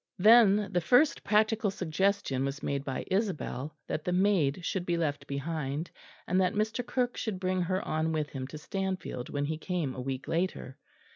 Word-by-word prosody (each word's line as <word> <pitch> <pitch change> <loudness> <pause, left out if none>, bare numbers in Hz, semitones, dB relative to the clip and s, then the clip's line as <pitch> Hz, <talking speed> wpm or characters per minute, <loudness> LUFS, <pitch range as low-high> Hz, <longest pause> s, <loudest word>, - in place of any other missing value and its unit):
Then 210 -1 +6
the 175 - +2
first 280 - +4
practical 215 0 +2
suggestion 190 -5 0
was 140 +1 -3
made 140 -1 -1
by 135 -2 -4
Isabel 170 - -2
that 155 - -3
the 180 - -1
maid 180 -4 +2
should 190 - -1
be 175 -1 0
left 145 -3 -2
behind, 145 +1 -3 0.3
and 185 +2 +2
that 185 - +1
Mr. 215 +3 0
Kirke 245 +1 -1
should 215 -5 -3
bring 185 0 0
her 185 +2 -1
on 160 +1 0
with 155 -2 -2
him 130 -2 -5
to 155 - -8
Stanfield 185 -5 -4
when 145 -1 -1
he 155 +1 -3
came 170 -7 -2
a 130 - -5
week 130 0 -4
later. 165 -6 -2
175 Hz, 185 wpm, -30 LUFS, 145-200 Hz, 0.3 s, Then